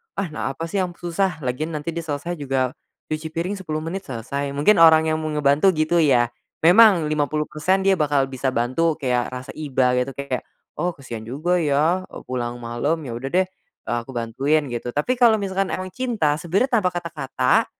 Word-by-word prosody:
"Ah 190 -5 -3
na 135 -2 -3
apa - - -6
sih 165 +4 -2
yang 180 -2 -2
susah 175 -2 -2
lagian 155 +6 -2
nanti 150 +3 -3
dia 170 0 -4
selesai 150 +3 -3
juga 130 -2 0 0.4
cuci 155 +1 -2
piring 175 +5 -3
10 155 -4 -4
menit 190 +4 -5
selesai."Mungkin 140 - 0
orang 160 -1 +6
yang 155 - 0
mau 155 - -3
ngebantu 150 +4 +3
gitu 155 +2 +2
ya. 120 -6 +3 0.3
Memang 185 0 +7
50% 150 +5 0
dia 195 -3 +3
bakal 140 -3 +1
bisa 130 +1 -2
bantu 140 +7 +1
kayak 125 -5 0
rasa 130 0 -7
iba 130 -4 +1
gitu 130 +1 -3
kayak, 140 -2 -4 0.3
"Oh, 175 +1 -1
kasihan 130 -5 -7
juga 155 +10 0
ya, 160 +5 +1
e - - -15
pulang 120 -1 -3
malam. 120 +8 -1
Ya 125 - -6
udah 135 +2 -5
deh, 185 +1 +4
eee, 120 -9 -7
aku 135 - -10
bantuin," 135 +7 +1
gitu. 120 0 -4
Tapi 245 +12 0
kalo 235 -3 +6
misalkan 195 -1 -1
emang 185 0 -4
cinta, 205 -11 0
sebenarnya 215 +9 +1
tanpa 180 -3 0
kata-kata, 150 -7 0
155 Hz, 185 wpm, -22 LUFS, 135-175 Hz, 0.4 s, Memang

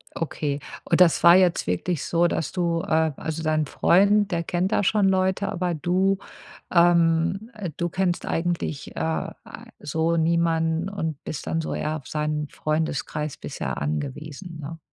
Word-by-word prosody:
Okay. 150 -3 -2 0.2
Und - - +1
das 175 -3 +5
war 170 0 +9
jetzt 180 -2 +3
wirklich 140 - -1
so, 170 0 +2
dass 160 - -2
du, 170 -2 0
äh 160 -1 +1
also, 160 0 -4
dein 155 -1 +1
Freund, 200 +7 +3
der 170 -1 0
kennt 180 +3 -1
da - - +2
schon 205 0 +3
Leute, 190 +1 +1
aber 180 -2 -1
du, 185 +5 +1 0.6
ähm 170 +4 +3 0.3
du 175 - 0
kennst 180 -1 -1
eigentlich, 165 -3 -2
äh, 160 0 -1 0.5
so 160 +3 0
niemanden 165 +1 +1
und 160 -7 -4
bist 150 - -6
dann 165 - 0
so - - -4
eher 155 +1 -2
auf 145 -4 -8
seinen 150 -1 -2
Freundeskreis 150 -1 -2
bisher 70 - -5
angewiesen, 145 - -4
ne? 160 +3 -7
165 Hz, 155 wpm, -24 LUFS, 155-180 Hz, 0.6 s, war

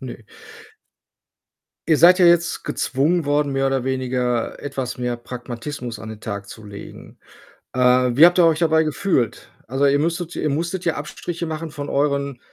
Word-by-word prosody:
Ne. - - -7 1.7
Ihr 155 - +4
seid 180 +3 +7
ja 180 - +5
jetzt 170 0 +3
gezwungen 150 +4 0
worden, 145 -1 +1
mehr 135 0 +1
oder 135 -2 0
weniger 125 -2 -1
etwas 135 -3 -5
mehr 125 -1 -3
Pragmatismus 120 0 -7
an 110 - -9
den 110 -1 -9
Tag 100 -2 -6
zu 110 - -11
legen. 100 -1 -11 0.6
Äh, 130 - -3 0.3
wie 145 +7 +5
habt 175 - +1
ihr 175 - +6
euch 160 0 +3
dabei 160 -1 +3
gefühlt? 155 - -1 0.2
Also, 135 +3 +1
ihr 140 - +3
müsstet 170 +3 -2
ihr 150 - -1
musstet 170 +5 -2
ja 170 - +2
Abstriche 170 +3 -5
machen 160 0 -5
von 145 -1 -6
euren, 140 -2 -1
140 Hz, 170 wpm, -21 LUFS, 125-165 Hz, 1.7 s, seid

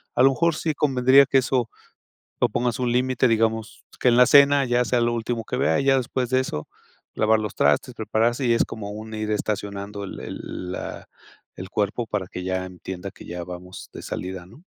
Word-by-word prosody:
a 125 - +4
lo 135 - +7
mejor 170 +3 +1
sí 160 -1 -1
convendría 135 -1 +5
que 135 - +3
eso 125 -2 0 0.7
lo 125 - +4
pongas 120 +1 -1
un 125 -1 0
límite, 130 +1 +2
digamos, 110 0 0 0.2
que - - -1
en 120 - +4
la 125 - +9
cena 140 0 +6
ya 125 0 +2
sea 125 0 +1
lo 120 0 +1
último 115 0 -2
que 125 - -4
vea, 135 0 +2
ya 135 -1 +3
después 125 0 -2
de 130 - +3
eso 75 -12 -4 0.5
lavar 110 0 +3
los 105 -1 -4
trastes, - - +2
prepararse 120 +4 0
y 120 - +4
es - - +3
como 105 -2 -7
un 110 +1 -8
ir 110 0 -3
estacionando 100 -1 -3
el 95 - -8
el 90 0 -7
la - - -6 0.5
el 95 - -7
cuerpo 105 +3 -1
para 105 -3 -3
que 90 - -7
ya 95 0 -1
entienda 95 +1 -7
que - - -14
ya 85 0 -5
vamos 90 +1 -9
de - - -9
salida, 90 -1 -6
¿no? 145 - -17
115 Hz, 205 wpm, -24 LUFS, 100-125 Hz, 0.7 s, la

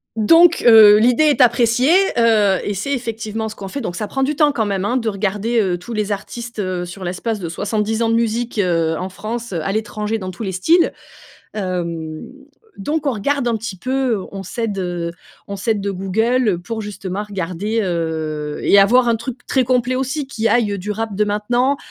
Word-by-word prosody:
Donc, 330 +11 +5
heu, 220 -3 +9
l'idée 245 +7 +4
est 290 -5 +3
appréciée, 240 +2 +3 0.3
heu, 215 -5 +4
et 205 - -2
c'est 245 +9 -3
effectivement 225 -3 -4
ce 215 - -9
qu'on 195 - -7
fait, 280 +8 -5
donc 180 -5 -4
ça 210 - -3
prend 270 +5 -2
du 290 +1 -1
temps, 295 -2 +4
quand 220 -5 0
même, 195 -1 -2
hein, 245 - 0
de 230 -3 0
regarder, 210 +3 -1
heu, 185 -4 +1
tous 180 +7 -11
les 210 -2 -1
artistes, 235 +3 -7
heu, 185 -2 -2
sur 185 +2 -9
l'espace 195 +5 -3
de 170 -3 -5
70 210 +5 -2
ans 230 - +2
de 230 - +2
musique, 230 0 -1
heu, 165 -3 +1
en 185 +3 -4
France, 225 +4 -6
à 165 -1 -3
l'étranger, 215 0 -2
dans 185 -2 -6
tous 220 - -8
les 190 -2 -3
styles. 330 - +3 0.6
Hem, 170 -5 -4 0.6
donc 295 +8 -2
on - - +3
regarde 250 +4 -1
un 230 -2 +1
petit 220 -2 -6
peu, 255 -4 -1
on 195 -1 -6
s'aide, 210 +1 -4
heu 175 -2 -3 0.4
on 200 - -5
s'aide 205 +1 -1
de 200 - -2
Google 205 +2 0
pour 220 +3 -4
justement 205 -1 -5
regarder, 195 +3 -3
heu, 160 -4 -3
et 200 - +4
avoir 240 +5 +5
un 230 - +3
truc 240 +2 -7
très 260 - +2
complet 250 0 +1
aussi, 270 +2 -2
qui 225 -4 -1
aille, 225 -4 +2
heu, - - -3
du 205 +3 -4
rap 215 -1 -4
de 210 - +2
maintenant 240 +7 0
215 Hz, 205 wpm, -19 LUFS, 190-240 Hz, 0.6 s, heu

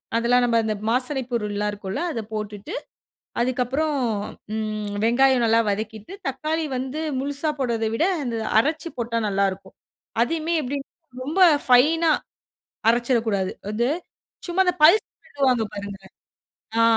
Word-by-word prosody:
அதெல்லாம் 245 +2 +3
நம்ப 230 -1 +2
அந்த 215 -1 -1
மாசனைப் 255 +1 -1
பொருள்லாம் 210 -2 -1
இருக்கும்ல, 205 - -4
அத 230 - -3
போட்டுட்டு, 210 - -5 0.7
அதுக்கப்புறம் 255 +5 0 0.6
ம் 215 -1 -3
வெங்காயம் 250 +1 +4
நல்லா 225 0 +4
வதக்கிட்டு, 215 - -4
தக்காளி 310 +4 -1
வந்து 265 +5 -3 0.2
முழுசா 285 +3 -1
போடுறத 230 -4 0
விட 325 - +2 0.2
அந்த 235 -2 -2 0.2
அரச்சி 310 +6 0
போட்டா 230 0 -1
நல்லாயிருக்கும். 195 -1 -1 0.5
அதையுமே 330 +4 -1
எப்டி 280 +1 -3 0.5
ரொம்ப 310 +8 -2 0.3
ஃபைனா 310 +6 +5 0.8
அரச்சிரக்கூடாது. 230 -5 +1 0.2
அது 235 +3 +1 0.6
சும்மா 350 +2 +2
அந்த 360 0 +2
பல்ஸ் 345 +8 +7 0.2
விடுவாங்க 260 - +2
பாருங்க. 200 0 -6 0.8
ஆ - - +6
240 Hz, 120 wpm, -24 LUFS, 215-285 Hz, 0.8 s, பல்ஸ்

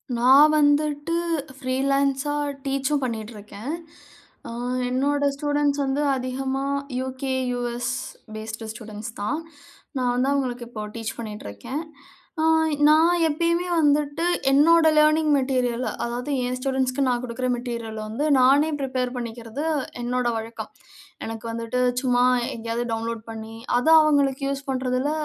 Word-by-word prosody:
நான் 265 +6 +7
வந்துட்டு, 290 +2 +2 0.4
ஃப்ரீலான்ஸா 275 +2 0 0.3
டீச்சும் 275 +1 0
பண்ணிட்ருக்கேன். 220 +1 -5 0.8
அ - - -6 0.4
என்னோட 285 +3 +1
ஸ்டூடண்ட்ஸ் 290 0 0
வந்து 270 +2 0
அதிகமா 265 +1 -2 0.3
யூகே, 260 +1 -3 0.2
யுஎஸ் 245 +1 -2 0.4
பேஸ்டு 220 +1 -6
ஸ்டூடண்ட்ஸ் 215 0 -8
தான். 275 +10 -1 0.6
நான் 250 -1 +1
வந்து 255 +2 +1
அவுங்களுக்கு 250 -3 -2
இப்போ 215 -3 -6
டீச் 225 -1 -5
பண்ணிட்ருக்கேன். 215 - -6 0.6
அ - - +2 0.4
நான் 320 +3 +5
எப்பயுமே 335 +3 0
வந்துட்டு 295 +1 +2 0.3
என்னோட 320 +4 +6
லர்னிங் 305 0 +4
மெட்டீரியல் 255 -2 0 0.2
அதாவது, 240 +4 -3 0.2
என் 250 0 -2
ஸ்டூடண்ட்ஸ்க்கு 265 0 0
நான் 245 -1 +1
குடுக்குற 250 +1 -3
மெட்டீரியல் 235 -2 -5
வந்து, 230 +8 -2
நானே 275 +5 +5
பிரிப்பேர் 255 -2 -2
பண்ணிக்கிறது 235 +3 -5 0.4
என்னோட 250 +1 -1
வழக்கம். 225 +1 -6 0.6
எனக்கு 225 0 -6
வந்துட்டு 230 +2 -3 0.2
சும்மா 250 -2 +2 0.3
எங்கயாவது 230 +1 -3
டவுன்லோட் 225 0 -3
பண்ணி, 225 0 -7 0.2
அதை 300 +6 +3
அவுங்களுக்கு 280 -3 +2
யூஸ் 275 0 -2
பண்ணுறதுல 260 +1 0
255 Hz, 120 wpm, -24 LUFS, 235-285 Hz, 0.8 s, நான்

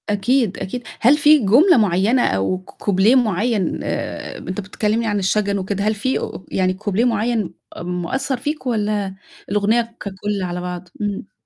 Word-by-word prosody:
أكيد، 210 +1 +1
أكيد. 245 +6 -5 0.2
هل 265 +6 +5
في 300 0 +6
جملة 260 - +5
معينة 210 +4 +3
أو 95 - 0
ك 185 - -15
كوبليه 200 +5 +2
معين 215 -4 +1
آآ - - -4
ب - - -12
أنت 185 +2 -3
كنت 190 - -13
بتكلمني 215 +2 0
عن 205 -1 0
الشجن 200 +1 +1
وكده، 195 +1 -2
هل 215 +1 +1
في 260 +6 -1
أ - - -6
يعني 185 -1 +1
كوبليه 205 +4 0
معين 225 -5 0 0.2
م 180 +1 -3
مأثّر 265 +8 -2
فيك، 295 +3 -4
والّا 210 -4 -1 0.3
الأغنية 220 +3 +1
ككل 200 +1 -4
على 180 0 -3
بعض؟ 180 0 -6
امم. 205 -1 -3
205 Hz, 175 wpm, -20 LUFS, 190-235 Hz, 0.3 s, في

